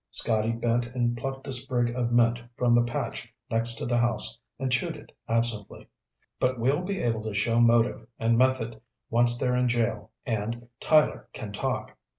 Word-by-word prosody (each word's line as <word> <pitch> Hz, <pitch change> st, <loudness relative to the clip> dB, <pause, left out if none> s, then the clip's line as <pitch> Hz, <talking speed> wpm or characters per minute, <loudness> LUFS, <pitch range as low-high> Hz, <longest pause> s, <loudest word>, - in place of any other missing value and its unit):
Scotty 110 Hz, 0 st, 0 dB
bent 115 Hz, +1 st, 0 dB
and 120 Hz, -1 st, +1 dB
plucked 135 Hz, +3 st, -5 dB
a -, -, -3 dB
sprig 125 Hz, -2 st, -1 dB
of 120 Hz, -1 st, -1 dB
mint 120 Hz, 0 st, +3 dB, 0.2 s
from 120 Hz, -1 st, +3 dB
the 120 Hz, -, +6 dB
patch 120 Hz, 0 st, -3 dB, 0.2 s
next 115 Hz, +1 st, +1 dB
to -, -, -4 dB
the 120 Hz, 0 st, +1 dB
house 120 Hz, -1 st, 0 dB, 0.2 s
and 130 Hz, -2 st, -2 dB
chewed 120 Hz, -, 0 dB
it -, -, -14 dB, 0.2 s
absently. 115 Hz, -3 st, -2 dB, 0.5 s
"But 130 Hz, 0 st, +1 dB
we'll 135 Hz, +7 st, +2 dB
be 195 Hz, +1 st, -3 dB
able 115 Hz, -2 st, 0 dB
to 110 Hz, -1 st, -5 dB
show 115 Hz, +3 st, +2 dB
motive 115 Hz, -1 st, +3 dB
and 115 Hz, 0 st, +2 dB
method 120 Hz, -3 st, +1 dB, 0.3 s
once 120 Hz, +1 st, +4 dB
they're 125 Hz, 0 st, +1 dB
in 125 Hz, 0 st, +2 dB
jail 115 Hz, -3 st, 0 dB, 0.2 s
and 115 Hz, +1 st, -3 dB
Tyler 155 Hz, -1 st, +3 dB
can -, -, -6 dB
talk. -, -, -3 dB
120 Hz, 175 wpm, -27 LUFS, 115-125 Hz, 0.5 s, the